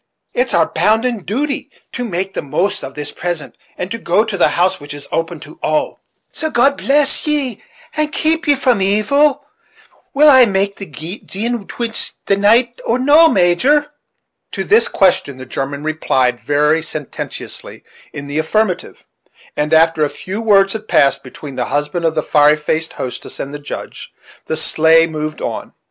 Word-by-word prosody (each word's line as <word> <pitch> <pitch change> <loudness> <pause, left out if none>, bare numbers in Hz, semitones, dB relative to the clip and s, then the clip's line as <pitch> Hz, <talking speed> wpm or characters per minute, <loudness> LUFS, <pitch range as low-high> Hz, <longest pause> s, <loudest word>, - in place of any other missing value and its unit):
It's 250 +1 0
our 165 - +4
bounden 220 +9 +1
duty 275 +4 -2 0.2
to 250 - -4
make 190 -3 -3
the - - -3
most 175 +8 -1
of 135 0 -8
this 150 -1 -5
present, 175 -3 -5 0.2
and 180 +2 -5
to 230 - -4
go 205 +1 +2
to 220 -3 -4
the 185 - +4
house 185 +2 +1
which 145 0 -8
is 145 - -9
open 165 0 -2
to 155 - -13
all; 155 0 -1 0.3
so 315 - -3
God 275 +1 +3
bless 285 +2 +1
ye, 280 -7 -1 0.3
and 305 -1 0
keep 320 0 0
ye 290 - +5
from 250 -6 +1
evil! 280 +9 +2 0.7
Will 300 +2 +6
I 260 -4 +8
make 200 0 -1
the 195 - -7
gin 200 +8 -5
twist 235 -2 -4
the 195 - +2
night, 230 +4 +2
or 235 - +1
no, 295 +5 +6
Major?" 265 - +2 0.6
To - - -2
this 440 +2 +4
question 175 -8 +1
the 130 - -9
German 140 +3 -4
replied, 130 -5 0
very 150 +3 +1
sententiously, 155 -3 -7 0.3
in 145 - -7
the 145 +2 -3
affirmative; 185 +3 -1 0.5
and, 150 +1 -1
after 160 -1 +4
a 150 - +1
few 195 +8 -6
words 195 -3 +4
had 220 -1 -6
passed 140 0 +3
between 135 +1 -10
the 125 - 0
husband 150 +4 -2
of 160 -1 +1
the 155 - 0
fiery 150 0 +4
faced 155 +1 -2
hostess 125 - -6
and 140 - -5
the 145 - -6
Judge, 145 - -8 0.4
the 160 - -1
sleigh 160 +1 +4
moved 155 -1 -5
on. - - -5
190 Hz, 175 wpm, -17 LUFS, 155-240 Hz, 0.7 s, I